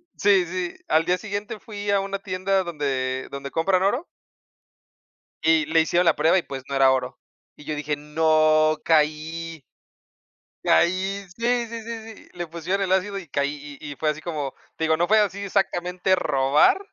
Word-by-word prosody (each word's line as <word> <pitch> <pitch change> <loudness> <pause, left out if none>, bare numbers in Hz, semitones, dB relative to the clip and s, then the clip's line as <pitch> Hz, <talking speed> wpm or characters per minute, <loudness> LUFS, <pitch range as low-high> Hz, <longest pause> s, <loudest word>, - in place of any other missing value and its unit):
sí, 195 -3 +4
sí, 180 0 -4
al 160 +1 +3
día 180 +1 +2
siguiente 205 0 -5
fui 205 -2 -6
a 200 - +3
una 195 0 -3
tienda 190 0 0
donde 135 -5 -2
donde 140 0 -6
compran 185 +3 +2
oro 245 - 0 1.4
y 160 -2 +4
le 160 +1 +3
hicieron 175 +2 +2
la 165 - +4
prueba, 160 +5 +3
y, - - 0
pues, 135 -1 -7
no 140 - -2
era 135 -1 +5
oro. 130 0 -2 0.4
Y 150 - -14
yo 155 - -3
dije: 150 0 -2
"No, 155 0 +3
caí" 160 0 0 1.0
Caí, 190 - +2
sí, 240 0 +1
sí, 230 0 -7
sí, 225 -1 -7
sí, - - -17
le 175 - -4
pusieron 170 +4 -2
el 185 - -1
ácido 195 +1 +1
y 180 - -9
caí, 145 0 -3
y 145 - -7
y - - -10
fue 155 -1 +1
así 150 +1 -5
como, 150 -6 -4 0.2
te 160 - -2
digo, 160 0 +3
no 175 +1 0
fue 220 +1 +5
así 200 -1 +1
exactamente 185 -1 0
robar, 140 - +3
165 Hz, 180 wpm, -24 LUFS, 150-195 Hz, 1.4 s, era